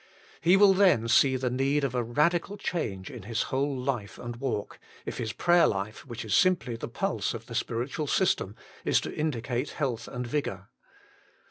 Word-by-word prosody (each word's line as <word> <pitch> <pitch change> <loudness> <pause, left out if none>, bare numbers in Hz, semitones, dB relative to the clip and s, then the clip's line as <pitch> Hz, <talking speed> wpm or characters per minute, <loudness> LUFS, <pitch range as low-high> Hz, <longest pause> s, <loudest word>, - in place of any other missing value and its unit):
He 175 +4 +5
will 200 -1 +7
then 185 - +4
see 130 +3 +5
the 130 -1 -1
need 135 +3 +1
of 135 -3 0
a 125 - +1
radical 165 - +1
change 100 - -3
in 120 - -8
his 115 +4 -1
whole 140 +1 0
life 125 -5 -3
and 120 -1 -6
walk, 120 -5 -3 0.3
if - - -5
his 110 -2 -2
prayer 175 +6 +4
life, 105 +6 -3
which 120 -2 -6
is 105 - -2
simply 180 - +3
the 115 - -5
pulse 185 0 -2
of 115 0 -8
the 115 - -9
spiritual 120 +6 -2
system, 135 - +1 0.3
is - - +3
to - - -5
indicate 130 -3 -2
health 125 -6 -2
and 125 -1 -5
.vigour. 115 -8 -3
125 Hz, 185 wpm, -28 LUFS, 115-150 Hz, 0.3 s, will